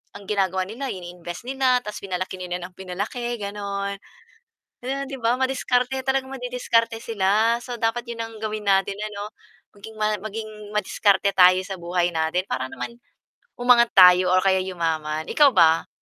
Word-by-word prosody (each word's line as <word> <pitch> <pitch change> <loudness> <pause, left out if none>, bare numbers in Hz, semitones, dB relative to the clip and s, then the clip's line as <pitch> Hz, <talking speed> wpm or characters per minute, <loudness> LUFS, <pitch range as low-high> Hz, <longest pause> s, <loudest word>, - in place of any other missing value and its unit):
ang 200 - -10
ginagawa 190 -2 0
nila 250 +7 -5
ini-invest 175 +2 -8
nila, 260 -1 +2
tapos 210 0 -6
pinalaki 185 -1 -4
nila 180 0 -3
nang 180 +1 -8
pinalaki, 205 +7 -4
gano'n. 200 0 -4 0.9
Yun 275 +2 -3
'di 270 - -6
ba 240 +2 +1
madiskarte, 260 -1 0
talagang 265 0 0
madidiskarte 245 -3 0
sila, 220 +1 +2
so 245 -2 -6
dapat 225 +1 0
yun 230 - -8
ang 225 0 -9
gawin 215 -1 -4
natin 195 +1 +2
ano, 210 0 -5 0.4
maging 220 +2 -12
ma 215 0 0
maging 220 +1 -6 0.3
madiskarte 200 -1 +2
tayo 185 0 +6
sa 190 -1 -7
buhay 175 0 0
natin 160 +2 0
para 130 0 -1
naman, 235 - -7 0.6
umangat 245 -1 +5
tayo 180 -1 +7
o 185 - +5
kaya 190 -1 +3
yumaman. 160 -4 -2
Ikaw 295 -2 +5
ba? 165 -2 +4
205 Hz, 155 wpm, -23 LUFS, 185-235 Hz, 0.9 s, tayo